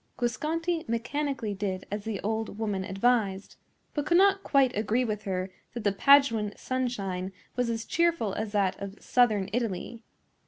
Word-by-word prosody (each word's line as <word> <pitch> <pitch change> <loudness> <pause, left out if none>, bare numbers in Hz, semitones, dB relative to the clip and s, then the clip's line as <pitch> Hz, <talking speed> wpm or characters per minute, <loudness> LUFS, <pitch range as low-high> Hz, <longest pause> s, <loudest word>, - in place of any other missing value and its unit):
Guasconti 320 +7 -1
mechanically 240 -1 -2
did 190 -2 -3
as 205 0 -4
the 220 -3 -3
old 220 0 -2
woman 205 -4 -1
advised, 195 0 0 0.4
but 295 - -1
could 345 +4 +3
not 395 +1 +5
quite 275 -3 +3
agree 220 +4 +1
with 215 -2 -3
her 185 -1 -2 0.2
that 235 - -4
the 205 - +3
Paduan 225 -3 +4
sunshine 200 -8 -2 0.2
was 245 -1 0
as 230 -1 -2
cheerful 335 - +1
as 215 0 -3
that 195 -3 +1
of 200 0 -7
southern 215 -6 +2
Italy. 230 0 -2
225 Hz, 155 wpm, -28 LUFS, 200-255 Hz, 0.4 s, not